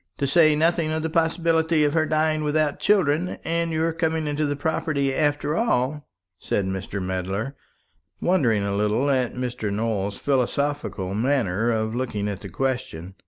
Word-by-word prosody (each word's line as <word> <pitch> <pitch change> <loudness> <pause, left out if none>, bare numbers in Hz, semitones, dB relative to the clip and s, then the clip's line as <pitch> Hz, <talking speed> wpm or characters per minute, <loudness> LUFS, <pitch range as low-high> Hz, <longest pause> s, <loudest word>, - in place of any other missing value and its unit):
"To 140 - 0
say 155 +2 +5
nothing 165 +1 +2
of 160 0 -2
the 160 - -2
possibility 165 -1 +2
of 145 -1 +2
her 160 -1 +2
dying 155 0 +1
without 150 -1 +1
children, 180 -4 +2
and 170 0 0
your 160 +1 0
coming 160 -1 -1
into 150 0 -1
the 145 - -1
property 150 -2 -1
after 145 +1 0
all," 150 - 0 0.3
said 100 - -1
Mr. 95 +1 -4
Medler, 95 +7 -3 0.6
wondering 125 - +2
a 100 0 -1
little 105 +7 +1
at 130 -3 0
Mr. 125 -4 -3
Nowell's 105 -2 -2
philosophical 140 -7 -1
manner 115 -3 +1
of 110 -1 0
looking 115 -5 -2
at 100 -2 -4
the 100 - -9
question. 95 -6 -3
140 Hz, 160 wpm, -24 LUFS, 110-160 Hz, 0.6 s, say